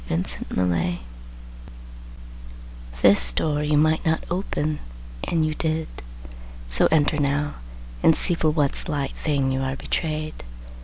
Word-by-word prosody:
VI 85 Hz, +6 st, -1 dB, 0.2 s
Bluebeard 90 Hz, -1 st, 0 dB, 2.1 s
This 60 Hz, 0 st, +7 dB
door 145 Hz, -, 0 dB
you 150 Hz, 0 st, +1 dB
might 155 Hz, +1 st, +3 dB
not 160 Hz, 0 st, 0 dB
open, 155 Hz, -5 st, -2 dB, 0.5 s
and 165 Hz, -2 st, +1 dB
you 155 Hz, -, -1 dB
did; 160 Hz, 0 st, -2 dB, 0.8 s
So -, -, +3 dB
enter 155 Hz, -1 st, +2 dB
now, 145 Hz, +1 st, 0 dB, 0.4 s
and 160 Hz, -, +5 dB
see 180 Hz, -, +2 dB
for 165 Hz, -2 st, +1 dB
what 150 Hz, -3 st, +1 dB
slight 145 Hz, -4 st, -1 dB
thing 140 Hz, -3 st, 0 dB
You 130 Hz, 0 st, -1 dB
are 135 Hz, 0 st, -2 dB
betrayed. 155 Hz, -, -3 dB
150 Hz, 125 wpm, -23 LUFS, 135-155 Hz, 2.1 s, This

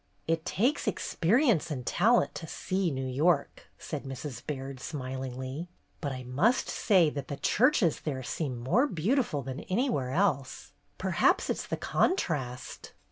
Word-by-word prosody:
"It 165 Hz, 0 st, 0 dB
takes 250 Hz, +9 st, +1 dB
experience 205 Hz, -, +2 dB
and 130 Hz, -5 st, -4 dB
talent 225 Hz, -, +3 dB
to 160 Hz, -, -7 dB
'see 185 Hz, +2 st, -1 dB
New 135 Hz, -3 st, -3 dB
York,' 140 Hz, +4 st, +1 dB
" -, -, -38 dB
said 150 Hz, -3 st, -5 dB
Mrs. 135 Hz, 0 st, -6 dB
Baird, 135 Hz, -2 st, -5 dB
smilingly. 130 Hz, +2 st, -5 dB, 0.3 s
"But 145 Hz, -4 st, -3 dB
I 130 Hz, -1 st, -5 dB
must 155 Hz, -, +2 dB
say 180 Hz, -8 st, +3 dB
that 140 Hz, -1 st, -5 dB
the 140 Hz, -, -5 dB
churches 230 Hz, -, +3 dB
there 135 Hz, -4 st, -4 dB
seem 130 Hz, -1 st, -3 dB
more 135 Hz, -, +2 dB
beautiful 195 Hz, -, 0 dB
than 130 Hz, +2 st, -5 dB
anywhere 190 Hz, -, 0 dB
else. 140 Hz, -4 st, 0 dB, 0.3 s
Perhaps -, -, +2 dB
it -, -, -2 dB
's -, -, -5 dB
the -, -, -2 dB
contrast." 130 Hz, -, -1 dB
150 Hz, 150 wpm, -29 LUFS, 130-190 Hz, 0.3 s, talent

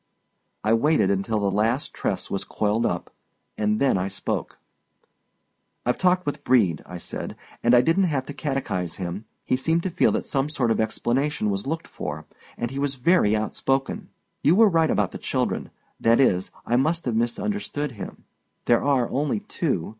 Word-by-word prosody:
I 110 Hz, -, +3 dB
waited 115 Hz, -4 st, +3 dB
until 100 Hz, +3 st, 0 dB
the 100 Hz, -1 st, +1 dB
last 115 Hz, +7 st, 0 dB
tress -, -, -3 dB
was -, -, -1 dB
coiled 110 Hz, +2 st, 0 dB
up, -, -, -4 dB, 0.4 s
and 105 Hz, 0 st, +1 dB
then 135 Hz, -8 st, +3 dB
I 95 Hz, -, -1 dB
spoke: 100 Hz, -, -3 dB, 1.3 s
"I've 125 Hz, -, +1 dB
talked 180 Hz, -1 st, +3 dB
with 145 Hz, 0 st, -3 dB
Brede," 105 Hz, -, +3 dB
I 90 Hz, -, -7 dB
said, -, -, -6 dB, 0.3 s
"and 120 Hz, +1 st, +5 dB
I 120 Hz, -, +7 dB
didn't 165 Hz, +8 st, +3 dB
have 140 Hz, -6 st, -1 dB
to 145 Hz, -, -7 dB
catechize 135 Hz, -, -2 dB
him. 95 Hz, +3 st, -5 dB, 0.2 s
He -, -, +2 dB
seemed 160 Hz, +6 st, +1 dB
to 190 Hz, -, -2 dB
feel 175 Hz, -, +3 dB
that -, -, -1 dB
some 140 Hz, +1 st, 0 dB
sort 130 Hz, -6 st, 0 dB
of -, -, +1 dB
explanation 120 Hz, +1 st, 0 dB
was 100 Hz, +5 st, -3 dB
looked 160 Hz, +3 st, -3 dB
for, -, -, -6 dB, 0.3 s
and 120 Hz, 0 st, -3 dB
he 135 Hz, -, -4 dB
was 140 Hz, -1 st, 0 dB
very 130 Hz, -, +3 dB
outspoken. 135 Hz, +5 st, -1 dB, 0.3 s
You 160 Hz, -, +4 dB
were 220 Hz, +1 st, +7 dB
right 165 Hz, -3 st, +3 dB
about -, -, +1 dB
the -, -, -7 dB
children—that 115 Hz, 0 st, -1 dB
is, 95 Hz, -9 st, +3 dB, 0.2 s
I 120 Hz, -, +2 dB
must 160 Hz, +6 st, +1 dB
have 120 Hz, -3 st, 0 dB
misunderstood 145 Hz, -, -1 dB
him. 110 Hz, -, -9 dB, 0.4 s
There 120 Hz, -, +3 dB
are 135 Hz, -4 st, +2 dB
only 150 Hz, +9 st, -1 dB
two. 155 Hz, -, -2 dB
130 Hz, 175 wpm, -24 LUFS, 110-150 Hz, 1.3 s, I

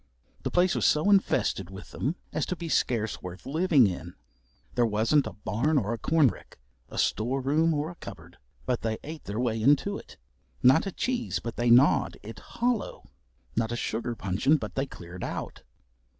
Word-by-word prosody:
The -, -, -2 dB
place 180 Hz, 0 st, +3 dB
was -, -, +2 dB
so 155 Hz, +7 st, +3 dB
infested 145 Hz, -, +2 dB
with 95 Hz, +1 st, -10 dB
them 145 Hz, +8 st, -2 dB, 0.2 s
as -, -, -1 dB
to 180 Hz, -, -2 dB
be 170 Hz, -1 st, -6 dB
scarce 110 Hz, -7 st, 0 dB
worth 90 Hz, +1 st, -8 dB
living 155 Hz, -3 st, +4 dB
in. 90 Hz, -3 st, -4 dB, 0.6 s
There 120 Hz, -, +2 dB
wasn't 115 Hz, +6 st, +2 dB
a -, -, -6 dB
barn 115 Hz, +10 st, 0 dB
or 115 Hz, -3 st, 0 dB
a 115 Hz, -, -5 dB
corn 155 Hz, +3 st, +4 dB
rick, -, -, -12 dB, 0.3 s
a -, -, -9 dB
store 125 Hz, +5 st, +1 dB
room 150 Hz, +5 st, +2 dB
or 155 Hz, +1 st, -1 dB
a 175 Hz, -, -16 dB
cupboard, 85 Hz, +2 st, -10 dB, 0.3 s
but 125 Hz, -2 st, 0 dB
they 110 Hz, -1 st, -1 dB
ate 155 Hz, +1 st, -8 dB
their 105 Hz, +3 st, -4 dB
way 115 Hz, -3 st, 0 dB
into 145 Hz, -, +3 dB
it. -, -, -15 dB, 0.5 s
Not 135 Hz, +9 st, +5 dB
a -, -, -2 dB
cheese 245 Hz, +4 st, -2 dB
but 115 Hz, -, -5 dB
they 120 Hz, 0 st, +1 dB
gnawed 125 Hz, +5 st, +5 dB
it 110 Hz, +1 st, -9 dB
hollow, 240 Hz, -2 st, -2 dB, 0.4 s
not 115 Hz, 0 st, 0 dB
a -, -, -1 dB
sugar 120 Hz, 0 st, -2 dB
puncheon 110 Hz, +11 st, +2 dB
but -, -, -6 dB
they 135 Hz, +1 st, -1 dB
cleared 90 Hz, -5 st, -9 dB
out. -, -, -5 dB
125 Hz, 190 wpm, -28 LUFS, 110-155 Hz, 0.6 s, Not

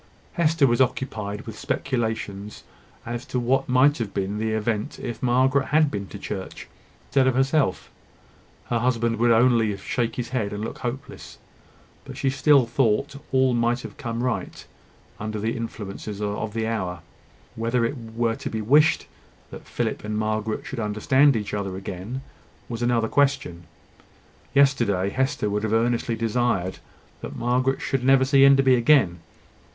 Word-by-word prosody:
Hester 165 Hz, -4 st, +3 dB
was 120 Hz, 0 st, +3 dB
occupied 110 Hz, -6 st, -1 dB
with 110 Hz, -1 st, -9 dB
speculations 110 Hz, -5 st, -3 dB, 0.4 s
as 120 Hz, +1 st, -4 dB
to 125 Hz, -, -1 dB
what 130 Hz, +3 st, +1 dB
might 130 Hz, +3 st, +4 dB
have 110 Hz, -4 st, -4 dB
been 100 Hz, +1 st, -2 dB
the 110 Hz, 0 st, -1 dB
event 110 Hz, 0 st, -2 dB
if 120 Hz, -2 st, -6 dB
Margaret 130 Hz, +2 st, +2 dB
had 150 Hz, 0 st, +3 dB
been 100 Hz, -2 st, -4 dB
to 100 Hz, -, -9 dB
church 100 Hz, -1 st, -7 dB, 0.4 s
instead 135 Hz, -1 st, +2 dB
of 130 Hz, -, +2 dB
herself. 135 Hz, -4 st, +1 dB, 0.8 s
Her 120 Hz, -, +2 dB
husband 115 Hz, -1 st, 0 dB
would 120 Hz, +2 st, +3 dB
only 115 Hz, -3 st, +3 dB
shake 115 Hz, +4 st, -2 dB
his 120 Hz, -1 st, -4 dB
head, 110 Hz, -6 st, -2 dB
and 105 Hz, +1 st, -4 dB
look -, -, -7 dB
hopeless: 130 Hz, +3 st, -6 dB, 0.7 s
but -, -, -10 dB
she 135 Hz, -, 0 dB
still 135 Hz, -1 st, +4 dB
thought 120 Hz, +3 st, +1 dB, 0.2 s
all 130 Hz, -1 st, +3 dB
might 120 Hz, +1 st, +1 dB
have -, -, -9 dB
come 115 Hz, 0 st, -4 dB
right, 125 Hz, -3 st, -3 dB, 0.5 s
under 110 Hz, 0 st, -4 dB
the 110 Hz, +2 st, -1 dB
influences 105 Hz, -2 st, -6 dB
of 105 Hz, +1 st, -3 dB
the 110 Hz, -1 st, -1 dB
hour. 95 Hz, -6 st, -3 dB, 0.5 s
Whether 115 Hz, +1 st, 0 dB
it 120 Hz, -, -2 dB
were 115 Hz, -1 st, -2 dB
to -, -, -5 dB
be 110 Hz, -, -3 dB
wished 145 Hz, +9 st, +4 dB, 0.5 s
that -, -, -10 dB
Philip -, -, -3 dB
and 105 Hz, 0 st, -3 dB
Margaret 110 Hz, 0 st, -2 dB
should 130 Hz, -, -6 dB
understand 120 Hz, +6 st, +3 dB
each 105 Hz, -2 st, -3 dB
other 100 Hz, -2 st, -3 dB
again, 95 Hz, +7 st, -6 dB, 0.5 s
was 115 Hz, -1 st, -5 dB
another 120 Hz, -1 st, +1 dB
question. 135 Hz, -11 st, 0 dB, 0.9 s
Yesterday 120 Hz, -9 st, +3 dB
Hester 130 Hz, -2 st, 0 dB
would 105 Hz, 0 st, -1 dB
have 110 Hz, 0 st, -1 dB
earnestly 115 Hz, 0 st, +1 dB
desired 115 Hz, -5 st, -1 dB, 0.4 s
that -, -, -7 dB
Margaret 130 Hz, +2 st, 0 dB
should 135 Hz, -2 st, -1 dB
never 135 Hz, 0 st, +5 dB
see 135 Hz, 0 st, +5 dB
Enderby 135 Hz, -1 st, +6 dB
again. 120 Hz, -, +4 dB
115 Hz, 155 wpm, -24 LUFS, 105-130 Hz, 0.9 s, Enderby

